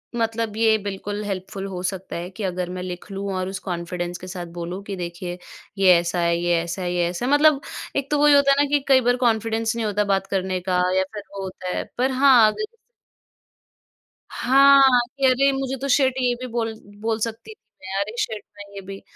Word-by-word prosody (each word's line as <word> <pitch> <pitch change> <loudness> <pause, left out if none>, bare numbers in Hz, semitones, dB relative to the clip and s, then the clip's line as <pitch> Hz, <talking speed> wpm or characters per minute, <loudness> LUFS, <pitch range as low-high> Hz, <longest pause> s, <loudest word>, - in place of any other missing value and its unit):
मतलब 225 -2 -1
ये 220 -1 +4
बिल्कुल 205 +1 -4
हेल्पफुल 195 0 -5
हो 180 -2 -6
सकता 190 0 -4
है 175 +2 -5
कि 200 +2 -8
अगर 180 -1 -2
मैं 180 0 -5
लिख 180 +2 -7
लूँ 195 0 -4
और 185 0 -2
उस 190 -1 -5
कॉन्फिडेंस 175 0 -4
के 185 - -10
साथ 180 -1 -6
बोलूँ 175 +3 -5
कि 200 -1 -5
देखिए 175 0 -6 0.4
ये 190 -2 +6
ऐसा 175 +1 -2
है, 170 0 +2
ये 175 0 +1
ऐसा 175 +2 -5
है, 175 0 -2
ये 175 -1 +1
ऐसा 180 +7 -4
है, 270 - 0
मतलब 290 -1 +5 0.3
एक 275 -1 -1
तो 295 - +2
वही 295 -1 +6
होता 280 -1 +5
है 285 +1 +4
ना - - -1
कि 290 0 +3
कई 265 -1 +6
बार 245 +1 +2
कॉन्फिडेंस 225 -1 0
नहीं 230 -2 -2
होता 210 0 +1
बात 195 -1 0
करने 190 -1 -1
का 180 0 +2 0.2
या 190 - +3
फिर 205 -1 -6
वो 195 -1 -5
होता 185 -1 -7
है। - - -1
पर 260 +2 +1
हाँ, 260 -4 +6
अगर 435 +2 -6 1.5
हाँ, 275 +1 +5 0.4
कि 270 - +3
अरे 270 +2 +4
मुझे 270 0 -2
तो 275 - -3
शिट 260 -1 +3
ये 245 -1 +2
भी 255 - -4
बोल 225 -2 -1 0.3
बोल 225 0 -1
सकती 230 - -4
थी - - -50 0.2
मैं 190 +1 -4
अरे 215 +4 -4
शिट 215 -1 -2
मैं 205 - -9
ये 195 - -6
भी। 195 +1 -9
205 Hz, 220 wpm, -23 LUFS, 185-250 Hz, 1.5 s, ये